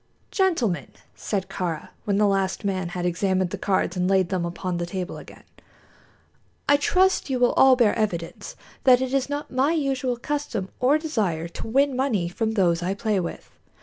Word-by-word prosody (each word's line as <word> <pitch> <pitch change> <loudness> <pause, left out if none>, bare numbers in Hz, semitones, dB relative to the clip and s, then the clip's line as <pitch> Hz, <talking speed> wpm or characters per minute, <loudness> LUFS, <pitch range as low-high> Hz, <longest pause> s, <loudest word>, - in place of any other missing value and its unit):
"Gentlemen," 250 - +1 0.3
said 195 -3 -3
Kāra, 170 -5 -4 0.2
when 200 -2 +1
the 210 - +4
last 195 0 0
man 185 -3 -1
had 175 0 -4
examined 185 +1 0
the - - -3
cards 190 -2 0
and 180 0 0
laid 190 -2 +3
them 185 -3 -1
upon 175 +1 -3
the 175 0 -3
table 185 +1 -4
again, - - -14 1.2
"I 285 - +6
trust 370 +3 +2
you 260 - 0
will 245 -1 +3
all 265 -1 +6
bear 235 -4 +3
evidence 175 -7 -3 0.3
that 250 -2 +6
it 260 0 -2
is 275 0 +1
not 290 +1 -4
my 265 +5 +2
usual 270 -5 -1
custom 280 -7 -3
or 265 +5 +4
desire 205 - -1
to 170 - -7
win 275 +3 +2
money 240 -10 0
from 220 +4 -2
those 175 -5 +2
I 185 +3 -1
play 210 -1 0
with. 170 - -6
205 Hz, 180 wpm, -24 LUFS, 180-260 Hz, 1.2 s, I